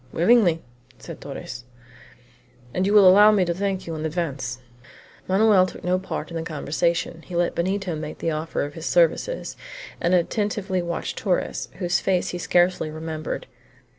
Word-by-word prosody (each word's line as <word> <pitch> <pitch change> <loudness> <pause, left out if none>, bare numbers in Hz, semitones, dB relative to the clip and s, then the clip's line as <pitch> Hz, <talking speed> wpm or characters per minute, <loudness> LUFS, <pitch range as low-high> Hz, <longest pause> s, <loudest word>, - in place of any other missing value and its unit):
"Willingly," 175 -3 +3 0.3
said - - -10
Torres; 125 -1 -7 1.1
"and 185 +1 0
you 205 - +1
will 200 -3 +8
allow 205 +3 +8
me 200 -4 +3
to 170 - 0
thank 190 +1 -2
you 165 - -5
in 155 -1 -5
advance." 150 -7 -3 0.7
Manoel 195 -1 +4
took - - -10
no 180 +1 +1
part 190 - -5
in 170 - -4
the - - -2
conversation; 165 +2 -1
he 180 - -7
let 175 0 +1
Benito 185 0 -1
make 155 0 -6
the 165 - -1
offer 155 +1 -2
of 145 0 -5
his 165 +1 -6
services, 175 - +1 0.5
and 175 +1 +3
attentively 195 +1 0
watched 170 -1 -4
Torres, 185 -4 -1
whose 175 -2 0
face 185 -2 0
he 175 - -4
scarcely 175 -2 +2
remembered. 155 0 -5
175 Hz, 165 wpm, -24 LUFS, 160-190 Hz, 1.1 s, will